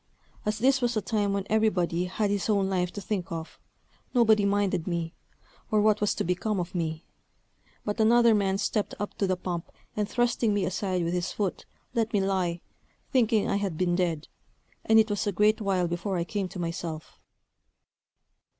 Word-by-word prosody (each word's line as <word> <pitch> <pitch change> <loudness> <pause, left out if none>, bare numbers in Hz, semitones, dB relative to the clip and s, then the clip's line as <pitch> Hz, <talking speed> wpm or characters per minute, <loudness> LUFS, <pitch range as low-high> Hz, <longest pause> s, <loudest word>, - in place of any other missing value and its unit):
As 210 0 0
this 265 +4 +3
was 240 -2 +1
a - - +1
time 205 0 0
when 200 -1 -1
everybody 180 -5 +1
had 200 +3 -1
his 205 0 -1
own 200 -2 +2
life 180 -2 0
to 205 - -6
think 190 -2 -3
of, 165 -1 -6 0.6
nobody 220 -4 +5
minded 200 -4 +1
me, 170 -1 -2 0.6
or 215 - +3
what 210 0 +3
was 210 - +1
to - - -1
become 185 +4 -1
of 180 +1 -4
me; 160 -2 -3 0.8
but 210 +2 -2
another 235 +1 +5
man 195 -2 +1
stepped 205 +1 -1
up 205 - -3
to 195 - +2
the 185 -1 0
pump, 175 -2 -4 0.2
and 210 -1 -1
thrusting 240 -3 +1
me 200 - +1
aside 185 -1 -1
with 170 +1 -1
his 175 -1 -1
foot, 200 -4 -3 0.3
let 225 -1 0
me 205 - +3
lie, 185 -3 0 0.5
thinking 230 -5 +3
I - - +1
had 195 -6 -2
been 175 0 +1
dead; 170 -4 -1 0.6
and 220 - +4
it 220 -1 +4
was 205 0 -1
a - - +2
great 210 +3 +3
while 190 -3 +1
before 175 +3 -2
I 170 - 0
came 195 +2 -3
to 185 - -9
myself. 165 -2 -5
200 Hz, 185 wpm, -27 LUFS, 180-215 Hz, 0.8 s, nobody